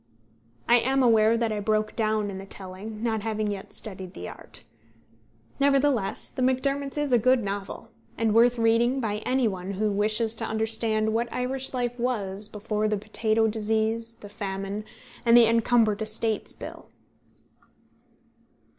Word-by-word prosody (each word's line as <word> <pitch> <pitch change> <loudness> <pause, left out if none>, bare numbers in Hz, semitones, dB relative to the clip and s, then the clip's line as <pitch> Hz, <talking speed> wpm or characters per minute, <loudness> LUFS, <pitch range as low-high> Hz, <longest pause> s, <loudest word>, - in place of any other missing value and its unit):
I 240 - +6
am 265 +2 +1
aware 225 -1 +4
that 230 -1 0
I 210 - -2
broke 215 +1 0
down 215 -2 0
in 190 - -6
the 195 - -8
telling, 200 +4 -7
not 220 -2 0
having 215 -1 -2
yet 195 -1 -7
studied 190 -3 -8
the 90 - -7
art. - - -12 1.0
Nevertheless, 275 -6 +1
The - - -5
Macdermots 275 +2 0
is 295 -3 0
a 240 - +6
good 255 +1 +3
novel, 200 +3 -5 0.3
and 225 -2 +1
worth 240 +2 +5
reading 230 +3 +2
by 215 -4 -1
any 255 -1 +2
one 190 -1 -4
who 210 +2 0
wishes 215 +2 +2
to 230 - -6
understand 220 0 +2
what 235 +1 -1
Irish 260 +1 -2
life 245 -1 -2
was 210 -5 -2
before 210 +1 -2
the 210 0 0
potato 215 +2 0
disease, 220 +1 -1
the 205 - -12
famine, 195 +1 -5 0.4
and 235 0 +6
the 235 - +8
Encumbered 225 -2 +2
Estates 220 0 -1
Bill. - - -10
220 Hz, 155 wpm, -26 LUFS, 210-240 Hz, 1.0 s, the